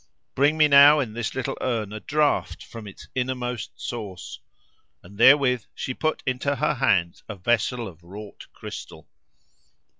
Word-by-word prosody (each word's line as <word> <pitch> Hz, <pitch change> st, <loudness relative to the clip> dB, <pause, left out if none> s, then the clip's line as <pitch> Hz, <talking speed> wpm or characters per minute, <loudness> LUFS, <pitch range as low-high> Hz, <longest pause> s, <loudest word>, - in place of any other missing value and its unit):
Bring 145 Hz, +4 st, +2 dB
me 155 Hz, -1 st, +5 dB
now, 145 Hz, +1 st, +8 dB
in 120 Hz, -6 st, -3 dB
this 115 Hz, -1 st, -4 dB
little 130 Hz, -2 st, -3 dB
urn, 110 Hz, -5 st, -2 dB
a 110 Hz, -, -5 dB
draught 150 Hz, +3 st, 0 dB
from 115 Hz, -2 st, -10 dB
its 95 Hz, -, -12 dB
innermost 125 Hz, -3 st, -3 dB
source." 105 Hz, -6 st, -7 dB, 0.6 s
And 100 Hz, +4 st, -15 dB
therewith 130 Hz, -2 st, +5 dB
she 130 Hz, -, -4 dB
put 155 Hz, +4 st, -2 dB
into 130 Hz, +2 st, -1 dB
her 150 Hz, +3 st, 0 dB
hands 95 Hz, -10 st, +1 dB
a 105 Hz, -, -5 dB
vessel 120 Hz, +4 st, 0 dB
of 85 Hz, -3 st, -13 dB
wrought 100 Hz, +4 st, -11 dB
crystal. -, -, -10 dB
125 Hz, 150 wpm, -24 LUFS, 105-140 Hz, 0.6 s, now